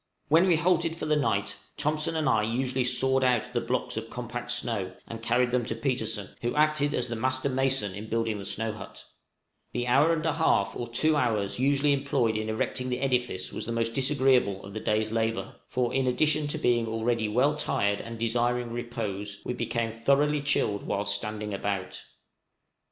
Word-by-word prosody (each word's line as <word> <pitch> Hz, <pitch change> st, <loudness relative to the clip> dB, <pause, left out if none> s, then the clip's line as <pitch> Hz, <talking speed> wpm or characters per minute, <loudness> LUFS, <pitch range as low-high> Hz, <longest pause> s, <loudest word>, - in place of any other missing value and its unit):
When 165 Hz, +5 st, +5 dB
we 175 Hz, -, +5 dB
halted 170 Hz, 0 st, +2 dB
for 165 Hz, -, -5 dB
the 155 Hz, 0 st, +2 dB
night, 105 Hz, -9 st, 0 dB, 0.2 s
Thompson 155 Hz, +2 st, 0 dB
and 155 Hz, -3 st, 0 dB
I 110 Hz, -, +3 dB
usually 125 Hz, +4 st, 0 dB
sawed 130 Hz, +1 st, +2 dB
out 125 Hz, -1 st, +1 dB
the 120 Hz, -, +1 dB
blocks 125 Hz, -1 st, -2 dB
of 115 Hz, 0 st, -4 dB
compact 120 Hz, 0 st, -6 dB
snow 115 Hz, -6 st, -1 dB
and 115 Hz, -1 st, -7 dB
carried 120 Hz, +2 st, +2 dB
them 125 Hz, -1 st, +1 dB
to 115 Hz, -, -2 dB
Petersen, 115 Hz, -5 st, -2 dB
who 120 Hz, 0 st, -1 dB
acted 150 Hz, -1 st, +2 dB
as 125 Hz, -, 0 dB
the 120 Hz, -, -3 dB
master 130 Hz, +4 st, 0 dB
mason 130 Hz, -6 st, 0 dB
in 105 Hz, +3 st, -7 dB
building 115 Hz, -2 st, -1 dB
the 100 Hz, -, -7 dB
snow 110 Hz, +3 st, -1 dB
hut: 105 Hz, -2 st, -10 dB, 0.7 s
the 120 Hz, 0 st, -1 dB
hour 140 Hz, +6 st, +4 dB
and 160 Hz, -1 st, 0 dB
a 160 Hz, -, +2 dB
half 100 Hz, -11 st, +2 dB
or 120 Hz, -, -4 dB
two 155 Hz, +7 st, +2 dB
hours 115 Hz, -7 st, 0 dB
usually 140 Hz, +2 st, +3 dB
employed 135 Hz, -5 st, +1 dB
in 110 Hz, 0 st, -2 dB
erecting 125 Hz, +3 st, -2 dB
the 125 Hz, 0 st, -1 dB
edifice 125 Hz, -8 st, -1 dB
was -, -, -5 dB
the -, -, -2 dB
most 115 Hz, 0 st, 0 dB
disagreeable 130 Hz, -7 st, +2 dB
of 100 Hz, -, -10 dB
the 110 Hz, -, -4 dB
day's 110 Hz, 0 st, 0 dB
labor, 115 Hz, 0 st, -1 dB
for, 125 Hz, -1 st, -1 dB
in 135 Hz, -1 st, +1 dB
addition 150 Hz, +3 st, +2 dB
to 145 Hz, -, -2 dB
being 120 Hz, -1 st, +2 dB
already 115 Hz, 0 st, 0 dB
well 130 Hz, +7 st, +2 dB
tired 100 Hz, -8 st, 0 dB
and 115 Hz, 0 st, -7 dB
desiring 120 Hz, +1 st, 0 dB
repose, 105 Hz, -4 st, -4 dB
we -, -, -2 dB
became 115 Hz, -2 st, -2 dB
thoroughly 140 Hz, +6 st, +2 dB
chilled 110 Hz, -8 st, 0 dB
whilst 100 Hz, 0 st, 0 dB
standing 105 Hz, 0 st, -3 dB
about. 100 Hz, -1 st, -3 dB
120 Hz, 190 wpm, -28 LUFS, 110-135 Hz, 0.7 s, When